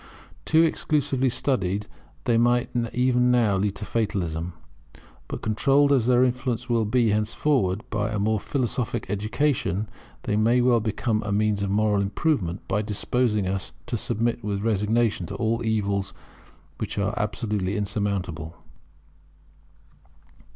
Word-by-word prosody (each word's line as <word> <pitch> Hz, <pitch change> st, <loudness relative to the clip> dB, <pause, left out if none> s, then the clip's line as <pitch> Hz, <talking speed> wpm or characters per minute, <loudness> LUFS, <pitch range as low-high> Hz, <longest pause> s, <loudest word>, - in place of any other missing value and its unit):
Too 160 Hz, +1 st, +5 dB
exclusively 145 Hz, -5 st, +1 dB
studied 105 Hz, -6 st, 0 dB, 0.4 s
they 120 Hz, -, +2 dB
might 120 Hz, +1 st, +2 dB, 0.2 s
even 125 Hz, 0 st, +2 dB
now 115 Hz, -5 st, +3 dB
lead 100 Hz, +1 st, 0 dB
to 105 Hz, -, -5 dB
fatalism; 90 Hz, -7 st, -2 dB, 0.7 s
but -, -, -6 dB
controlled 135 Hz, +6 st, +3 dB
as 125 Hz, -4 st, +2 dB
their 125 Hz, 0 st, +5 dB
influence 125 Hz, -1 st, -1 dB
will 115 Hz, -2 st, +1 dB
be 115 Hz, 0 st, +2 dB
henceforward 105 Hz, -1 st, +1 dB
by 105 Hz, -1 st, -1 dB
a 105 Hz, -, -2 dB
more 105 Hz, +1 st, +1 dB
philosophic 125 Hz, -2 st, -2 dB
education, 110 Hz, -, 0 dB, 0.4 s
they 105 Hz, -, -1 dB
may 115 Hz, +3 st, +3 dB
well 120 Hz, -1 st, +4 dB
become 110 Hz, 0 st, -1 dB
a 105 Hz, -1 st, -4 dB
means 105 Hz, 0 st, +1 dB
of 100 Hz, -, -1 dB
moral 105 Hz, 0 st, +2 dB
improvement, 100 Hz, -, -1 dB
by 105 Hz, +2 st, 0 dB
disposing 105 Hz, 0 st, 0 dB
us 95 Hz, -3 st, -2 dB
to -, -, -3 dB
submit 120 Hz, 0 st, -1 dB
with 100 Hz, -1 st, -2 dB
resignation 110 Hz, -3 st, +1 dB
to -, -, -6 dB
all 115 Hz, +1 st, 0 dB
evils 100 Hz, -3 st, -1 dB, 0.6 s
which -, -, -4 dB
are 100 Hz, +1 st, 0 dB
absolutely 105 Hz, -2 st, -2 dB
insurmountable. 95 Hz, -6 st, -3 dB
110 Hz, 135 wpm, -25 LUFS, 100-120 Hz, 0.7 s, Too